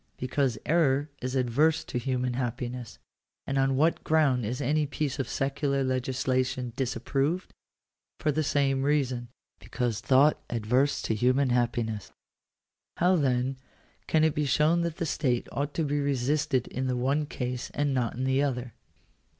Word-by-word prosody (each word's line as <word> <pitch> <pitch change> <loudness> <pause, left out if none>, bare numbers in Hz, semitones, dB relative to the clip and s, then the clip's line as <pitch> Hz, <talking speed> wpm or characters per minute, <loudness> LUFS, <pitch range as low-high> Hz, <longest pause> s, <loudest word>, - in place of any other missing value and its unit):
Because 130 -2 0
error 145 -3 +2
is 130 +1 -3
adverse 135 +5 +2
to 125 - -3
human 125 0 -1
happiness. 125 -1 -4 0.5
And 135 0 -1
on 135 0 +2
what 160 +5 +2
ground 140 -8 +2
is 125 +3 -3
any 150 +3 +1
piece 140 -1 -3
of 135 - -2
secular 140 0 0
legislation 130 -1 -1
disapproved? 135 +7 -1 0.6
For 150 - 0
the 155 +2 0
same 140 -2 +1
reason 135 -4 0 0.2
— - - -52
because 120 -4 -2
thought 140 +3 +4
adverse 125 +5 +1
to - - 0
human 125 +4 +2
happiness. 115 -4 -1 0.9
How 180 +2 +4
then 130 -3 +1 0.5
can 155 -1 +3
it 160 -1 +3
be 150 - 0
shown 150 +5 +3
that 170 -1 -2
the 170 - -1
state 130 -5 0
ought 145 +1 -3
to 165 - +1
be 145 0 0
resisted 140 -1 0
in 130 0 -3
the 125 -1 0
one 140 +4 0
case 125 -2 -4
and 145 -1 +1
not 125 -3 -1
in 130 - -3
the 130 +1 +2
other 125 -4 -2
135 Hz, 160 wpm, -28 LUFS, 125-145 Hz, 0.9 s, thought